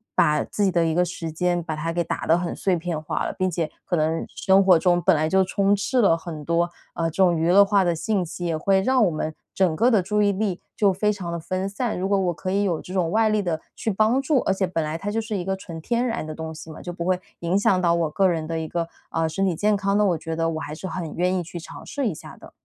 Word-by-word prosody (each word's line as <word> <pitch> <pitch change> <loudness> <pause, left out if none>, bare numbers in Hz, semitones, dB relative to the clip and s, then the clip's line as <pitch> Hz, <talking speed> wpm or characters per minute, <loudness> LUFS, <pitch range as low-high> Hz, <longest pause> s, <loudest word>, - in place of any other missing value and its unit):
把 150 0 +3
自 205 - -1
己 190 - +2
的 170 -1 +2
一 160 - +1
个 180 +1 +2
时 165 -2 -5
间 175 +1 0
把 160 -1 -4
它 165 +2 -2
给 175 - 0
打 - - -4
得 165 +2 +5
很 175 -1 -3
碎 190 -2 0
片 165 -2 -3
化 155 - -2
了， - - -3
并 185 0 +1
且 165 -2 -2
可 - - 0
能 160 0 0
生 195 0 +3
活 185 -3 +7
中 175 +1 +2
本 185 0 +4
来 155 +1 +1
就 190 +2 +4
充 200 +1 +2
斥 240 +5 +1
了 165 -6 +4
很 160 -2 -7
多， 170 +2 +1 0.3
呃， 165 - -1
这 190 +4 +2
种 175 -3 +3
娱 165 +2 +1
乐 200 +2 +8
化 200 -1 +2
的 175 -1 +1
信 195 +2 -1
息， 175 +2 -7
也 165 -2 0
会 190 +4 +2
让 255 0 +3
我 - - +3
们 155 -1 -3 0.2
整 185 -4 +2
个 240 - +4
的 220 -6 +4
注 210 +3 0
意 205 -1 +3
力 195 -2 -1 0.2
就 205 -2 +3
非 210 +3 +1
常 180 -4 -5
地 170 - -3
分 185 +4 -3
散。 220 +3 -2
如 190 +2 -2
果 200 -1 +3
我 180 -2 0
可 185 +3 -4
以 200 +1 +1
有 175 -5 0
这 185 - -9
种 180 -4 +1
外 220 +1 +3
力 215 -1 +2
的 165 -4 -2 0.2
去 - - -2
帮 220 +6 +2
助 275 0 +2
而 195 - +1
且 190 -1 0
本 165 -2 -1
来 155 +1 -3
它 195 +5 -4
就 225 +2 -1
是 215 -2 -3
一 175 - -4
个 190 0 0
纯 170 -3 -8
天 235 +9 0
然 230 -9 -2
的 155 - -6
东 160 0 -6
西 160 +1 -10
嘛， 155 - -9
就 175 - -5
不 170 -1 -5
会 185 0 +1 0.2
影 170 +3 +1
响 190 -2 +3
到 170 -1 +3
我 165 -2 0
个 190 +5 +2
人 165 -3 -1
的 165 0 -3
一 160 - -4
个， 170 +1 -3 0.2
呃， 165 0 0
身 195 +5 -1
体 180 -4 +1
健 210 +3 +2
康 200 +1 0
呢， 210 - +3
我 175 -4 +2
觉 160 +1 -5
得 165 0 0
我 160 - -3
还 150 -1 -6
是 175 - -8
很 170 -3 -4
愿 180 +2 +1
意 185 - 0
去 175 +1 -8
尝 165 - -10
试 280 -3 -3
一 - - -3
下 - - -11
的。 - - -14
180 Hz, 325 characters per minute, -24 LUFS, 165-195 Hz, 0.3 s, 乐